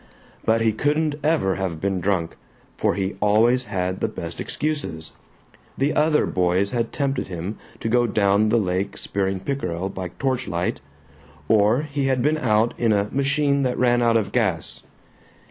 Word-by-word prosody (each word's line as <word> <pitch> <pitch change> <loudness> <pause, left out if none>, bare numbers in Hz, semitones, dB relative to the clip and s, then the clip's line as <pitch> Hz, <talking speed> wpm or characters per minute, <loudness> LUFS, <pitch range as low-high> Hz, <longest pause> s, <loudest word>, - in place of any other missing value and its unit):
But 115 0 +2
he 115 -1 +3
couldn't 150 +6 +1
ever 150 - +1
have 95 -4 -3
been 95 +1 -1
drunk, 90 -3 -1 0.4
for - - +1
he 95 -1 -2
always 115 +5 +3
had 95 -2 -2
the - - 0
best - - -6
excuses: 145 - -3 0.6
the 140 +3 +1
other 150 0 +3
boys 90 +2 +1
had 115 -2 -1
tempted 140 -2 -1
him 90 +3 -5 0.2
to - - -2
go 120 +1 +3
down 105 0 +2
the 120 - +3
lake 95 -1 -1
spearing 95 -1 -2
pickerel 95 -8 -3
by 95 -1 -5
torchlight, 125 -10 -1 0.7
or 110 +5 +3
he 145 -2 -2
had 130 -2 +1
been 155 +2 +2
out 115 -3 +2
in 115 -2 +2
a 100 0 +1
"machine 140 +1 +1
that 125 -2 0
ran 120 -1 +3
out 115 -1 +4
of 110 - -2
gas." 95 -9 -1
110 Hz, 165 wpm, -23 LUFS, 95-135 Hz, 0.7 s, out